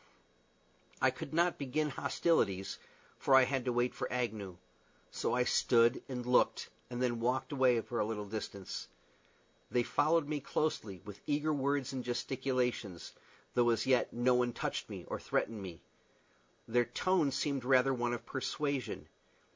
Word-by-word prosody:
I - - +4
could - - -7
not 170 +2 +2
begin 150 +2 -1
hostilities, 100 - 0 0.4
for 135 - +4
I 130 - +8
had 130 -1 -1
to 125 - +1
wait 120 +1 +1
for - - -4
Agnew; 110 -7 -3 0.5
so - - -1
I 125 - +3
stood 120 0 +3
and 125 -2 -4
looked, 125 0 +2 0.2
and 120 -1 -4
then 120 -2 0
walked 130 +3 0
away 130 -4 +4
for 120 +1 -4
a - - +3
little 105 -1 -3
distance. 100 -2 -5 0.8
They 120 - +2
followed 160 +4 +2
me 150 -1 -1
closely, 110 - -2
with 105 -1 -10
eager 150 +1 +1
words 140 -1 0
and 130 -2 -3
gesticulations, 125 -6 -2 0.4
though 120 -1 +4
as 115 -2 +1
yet 130 -1 +3
no 120 +1 +2
one 125 -1 +2
touched - - -3
me - - -7
or - - -4
threatened 110 -3 -1
me. 90 -4 -8 0.8
Their 120 +1 +3
tone 165 +6 +1
seemed 140 -1 -1
rather 130 +1 +4
one 120 -1 -1
of 120 - -9
persuasion. 140 -2 -3
125 Hz, 155 wpm, -33 LUFS, 115-135 Hz, 0.8 s, I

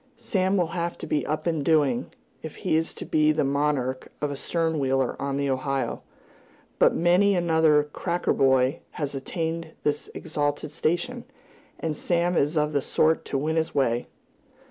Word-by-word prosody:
Sam 195 -4 0
will 175 -3 +1
have 170 -1 -2
to - - -7
be 150 -1 -1
up 155 +1 -2
and 160 -4 0
doing, 160 - +2 0.3
if 160 - -8
he - - -1
is 160 +1 0
to - - -7
be 155 0 +3
the 155 0 +1
monarch 140 -2 -1
of 150 -1 -1
a - - -3
stern 160 +2 -1
wheeler 135 -2 +1
on 140 0 -1
the 140 0 0
Ohio; 135 0 -1 0.8
but - - +5
many 180 +4 +4
another 160 -4 +4
"cracker" 175 0 0
boy 130 +2 +3
has 145 -4 -3
attained 160 +3 -4
this 150 0 -1
exalted 145 0 -2
station, 175 +11 -1 0.5
and 160 -2 -2
Sam 175 +2 0
is 150 +1 +1
of 150 0 +1
the 140 - +2
sort 160 +4 +1
to - - -2
win 155 +4 -1
his 160 0 -1
way. 120 -3 +1
155 Hz, 170 wpm, -25 LUFS, 140-170 Hz, 0.8 s, but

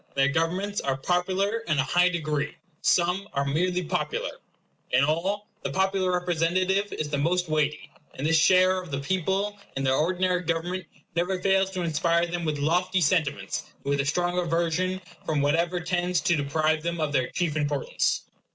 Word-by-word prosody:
Their 135 0 +3
governments 180 +7 -1
are 135 -1 -1
popular 185 +8 0
in 200 -9 -1
an - - 0
high 175 +6 +3
degree; 155 -4 -2 0.3
some 180 +3 +2
are 140 0 0
merely 180 +6 0
popular; 160 - -2 0.6
in 125 +2 +3
all, 190 +8 0
the - - -3
popular 190 -1 +1
representative 180 +3 +1
is 150 - -3
the 145 - 0
most 175 +4 +1
weighty; 150 -1 0 0.3
and 135 - -4
this 165 +1 +3
share 185 +2 +4
of 180 - -11
the 135 - -2
people 190 +7 -1 0.2
in 135 - -1
their 130 -1 +2
ordinary 180 +4 +1
government 175 +2 -2 0.3
never 180 +2 0
fails 190 0 +2
to 185 -2 -2
inspire 170 +1 +2
them 175 0 -3
with 155 -2 -1
lofty 180 +6 +1
sentiments, 160 -3 0 0.2
and 140 - -1
with 140 0 +2
a - - -3
strong 175 +5 0
aversion 175 +2 0 0.2
from 155 -2 0
whatever 170 +5 +1
tends 175 0 0
to 175 -4 +2
deprive 155 +2 +1
them 170 +1 -3
of 155 -2 -1
their 130 -3 +2
chief 170 -4 -1
importance. 145 -2 0
170 Hz, 175 wpm, -26 LUFS, 155-185 Hz, 0.6 s, share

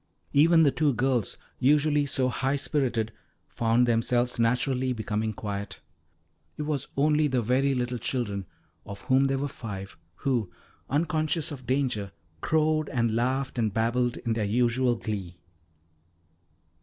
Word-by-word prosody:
Even 160 +3 +6
the 145 - +4
two 145 -4 +1
girls, 125 -4 0 0.2
usually 145 +1 +3
so 130 -1 +1
high 130 +3 0
spirited, 130 -6 0 0.4
found 115 +1 +2
themselves 120 +1 +1
naturally 125 +2 +1
becoming 110 -1 -2
quiet. 100 -1 -5 0.8
It 150 - -3
was 150 -3 -2
only 150 +1 +3
the 130 -4 0
very 135 +4 +2
little 125 -1 -2
children, 100 -8 -2 0.4
of 100 -1 -9
whom 130 +1 +3
there 135 0 0
were 140 +2 -1
five, 100 -7 -7 0.2
who, 120 -9 -1 0.4
unconscious 155 +1 0
of 130 -4 -9
danger, 125 -7 0 0.3
crowed 155 -1 +1
and 115 -3 0
laughed 130 +2 -1
and 110 -2 +1
babbled 120 +3 0
in 115 - -2
their 110 -1 -1
usual 120 +3 +2
glee. 100 -6 -5
125 Hz, 135 wpm, -27 LUFS, 115-140 Hz, 0.8 s, Even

